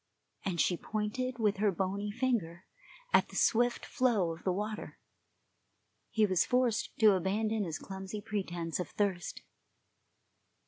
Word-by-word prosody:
and 180 -3 -2
she 175 - +3
pointed 220 +7 -3
with 210 -3 +2
her 205 0 +3
bony 195 +3 -2
finger 205 -8 -1 0.5
at - - +5
the - - -11
swift 240 +1 +2
flow 220 -9 +2
of 165 - -12
the 185 - +1
water. 210 +3 -4 1.1
He 220 -1 +3
was 185 -3 +3
forced 250 -3 +1
to 215 -1 +7
abandon 205 +3 0
his 160 -2 -3
clumsy 190 +2 -6
pretence 185 -6 -3
of 180 - -3
thirst. 195 -4 -2
205 Hz, 135 wpm, -32 LUFS, 185-220 Hz, 1.1 s, to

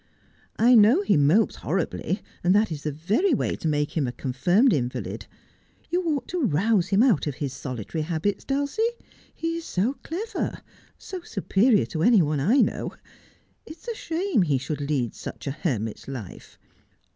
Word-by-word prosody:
'I 240 +3 +5
know 235 - +6
he - - +3
mopes 155 +10 +3
horribly, 185 +2 -2 0.2
and 180 +2 +4
that 210 -2 +3
is 150 -2 -4
the 150 - -2
very 210 - +1
way - - -1
to - - -3
make 150 -1 0
him 150 -5 +1
a - - -2
confirmed 175 - +2
invalid. 125 -4 -3 0.6
You 355 +1 +2
ought 300 -4 -1
to 360 -1 -2
rouse 195 - +2
him 195 +4 +3
out 220 - +3
of 145 - -2
his 140 -2 -4
solitary 135 - -5
habits, 170 +5 -2
Dulcie. 280 +8 -1 0.5
He 330 0 -3
is 335 - -6
so 230 +9 -1
clever 390 +8 -4 0.2
— - - -30
so 370 -2 -7
superior 210 - +2
to 160 - -4
any 220 -2 +5
one 150 -1 0
I 225 - +4
know. - - -1 0.7
It 315 - -9
is 325 - -21
a - - -1
shame 335 - -1
that 180 - +3
he 140 -3 +2
should 140 +3 -4
lead 140 -5 -1
such - - -8
a 140 - -1
hermit's 120 - -3
life. 125 -9 -8
185 Hz, 180 wpm, -25 LUFS, -, 0.7 s, know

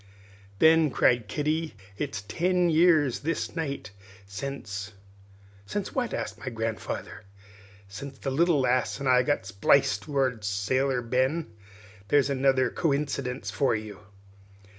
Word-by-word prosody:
"Then," 160 +2 +5
cried 120 -3 +2
Kitty, 155 +2 -2 0.2
"it's 110 -4 -4
ten 180 - +1
years 155 -5 +4
this 165 +3 -3
night 145 -9 -4 0.3
sence 105 -2 -6 0.4
" 100 0 -26
"Since 205 - -4
what?" 245 -3 -1
asked - - -4
my 130 - -5
grandfather. 110 -3 -4 0.7
"Sence 135 +8 -8
the 135 - -3
little 165 +2 +3
lass 130 +1 +1
and 140 - -3
I 125 -1 +5
got 135 -5 0
spliced!" 105 +3 +2
roared 130 -6 0
Sailor 125 +6 0
Ben. 130 +3 0 0.5
"There's 140 +3 +3
another 135 -1 +2
coincydunce 140 -4 -1
for 135 -5 +1
you!" 105 -2 -6
135 Hz, 125 wpm, -27 LUFS, 110-150 Hz, 0.7 s, Then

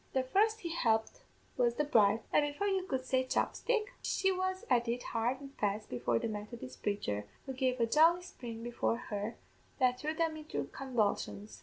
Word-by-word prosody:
The 260 - +2
first 430 +11 +2
he 340 - -3
helped 225 - +1 0.4
was 240 -1 +3
the 300 - +1
bride, 220 -6 +4
and, - - +6
before 290 +7 -2
you 385 -2 0
could 260 -4 -2
say 260 0 +2
chopstick, 430 - 0
she 385 0 +1
was 375 0 -1
at 240 -1 +3
it 240 +1 -1
hard 235 +3 0
an' 280 -1 -9
fast 210 +1 -1
before 120 -1 +1
the - - -1
Methodist 210 - -7
praicher, 105 - -1 0.2
who 265 - -4
gave 255 -1 0
a 230 - +4
jolly 325 +8 +5
spring 230 -9 -8
before 235 -1 0
her 205 +2 -2 0.4
that 250 -1 +3
threw 310 +3 -2
them 325 -1 +1
into 305 - -3
convulsions. 215 -5 -1
255 Hz, 185 wpm, -33 LUFS, 220-315 Hz, 0.4 s, and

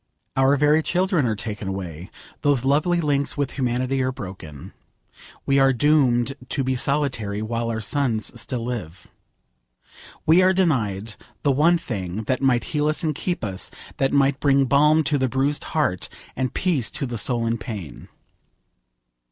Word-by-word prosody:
Our 135 +2 +4
very 150 +2 +4
children 180 -4 +1
are 110 - 0
taken 105 -1 -5
away. 90 -2 -5 0.3
Those 140 -4 +2
lovely 155 +6 +2
links 145 -3 0
with 140 -2 -1
humanity 130 +1 -1
are 130 0 0
broken. 95 - -9 0.7
We 140 0 +3
are 135 0 +5
doomed 130 -2 +3 0.2
to 140 - 0
be 130 0 0
solitary, 130 -7 -1
while 115 +1 -2
our 110 -1 -2
sons 115 -3 0
still 120 -3 -3
live. 95 -8 -6 1.2
We 165 +4 +6
are 185 +1 +4
denied 115 - 0 0.3
the 145 - +3
one 160 +6 +4
thing 105 - -4
that 130 +4 -1
might 125 -4 +2
heal 150 0 +1
us 155 +3 -1
and 155 -2 +1
keep 175 +2 -3
us, 95 -3 -2 0.3
that 135 0 +1
might 140 -1 +2
bring 140 -1 +3
balm 150 +4 +4
to 145 -1 +1
the 130 -1 +1
bruised 135 +3 0
heart, 145 - -1 0.3
and 130 -2 -1
peace 160 - 0
to - - -4
the 120 -3 -4
soul 120 +1 0
in 115 0 -1
pain. 100 - -7
130 Hz, 160 wpm, -23 LUFS, 110-145 Hz, 1.2 s, We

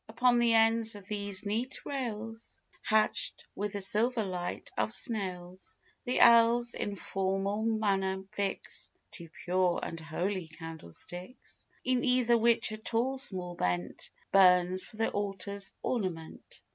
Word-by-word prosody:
Upon 245 +1 +3
the 235 -1 +4
ends 225 0 +3
of 200 -2 -11
these 205 -1 -2
neat 230 +6 -3
rails, 225 -4 -5 0.2
Hatch'd 215 0 +1
with 205 +1 -3
the 200 - -2
silver 225 +4 +2
light 180 -2 -5
of 220 - -1
snails, 185 -4 -3 0.3
The 250 - 0
elves, 235 0 +6
in 205 - -3
formal 195 +2 -1
manner, 195 -4 0
fix 200 -2 -3 0.2
Two 170 -2 -8
pure 180 0 +1
and 165 - -5
holy 175 +3 -3
candlesticks, 165 - -9 0.2
In 255 -1 +1
either 250 -2 +3
which 230 -1 +4
a 215 - -5
tall 240 +4 0
small 185 -8 +2
bent 90 - -2 0.2
Burns 185 -1 +5
for 215 - -12
the 225 - 0
altar's 200 0 -3
ornament. 185 -9 -4
205 Hz, 135 wpm, -30 LUFS, 185-230 Hz, 0.3 s, elves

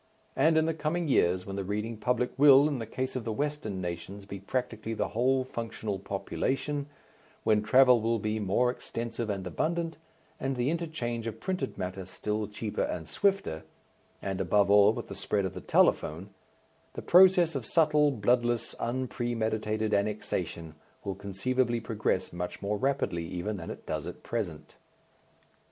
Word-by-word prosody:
And 160 0 +4
in 160 - +4
the 165 - +1
coming 160 +2 -1
years 90 -8 +2
when 100 0 -5
the 100 - -1
reading 105 +4 -3
public 125 +2 0
will, 140 0 +7
in 145 -4 -2
the 115 - -5
case 130 +3 -3
of 130 - -2
the 110 - -3
Western 125 -7 -2
nations, 90 +3 -6
be 100 0 -7
practically 115 +1 -3
the - - -1
whole 130 +3 +2
functional 110 -5 -4
population, 135 +9 -2 0.6
when 105 -1 +3
travel 125 +2 +6
will 115 +1 +1
be 110 +1 -2
more 105 +5 +2
extensive 115 -2 -5
and 100 -2 -2
abundant, 165 - -1 0.4
and 135 0 -1
the 125 +3 +1
inter 170 0 -2
change 120 -7 -3
of 110 0 -5
printed 185 +4 -3
matter 95 +1 -4
still 105 +4 -3
cheaper 105 +1 -4
and 80 -2 -2
swifter 195 - 0 0.6
and 95 -1 -2
above 100 -1 +3
all 105 0 +7
with - - -5
the - - -7
spread 100 -2 -1
of 95 - -3
the - - -7
telephone 85 +7 +2 0.6
the - - -6
process 180 -2 +6
of 130 -6 -4
subtle, 150 -2 +4
bloodless, 120 -1 +1
unpremeditated 110 -3 -1
annexation 100 -5 -2 0.3
will 100 - -2
conceivably 120 +6 -1
progress 110 -5 -1
much 90 0 -4
more 100 +1 -1
rapidly 100 -11 0
even 100 +5 -3
than 85 - -7
it - - -8
does - - -3
at - - -8
present. - - -4
115 Hz, 165 wpm, -29 LUFS, 100-130 Hz, 0.6 s, will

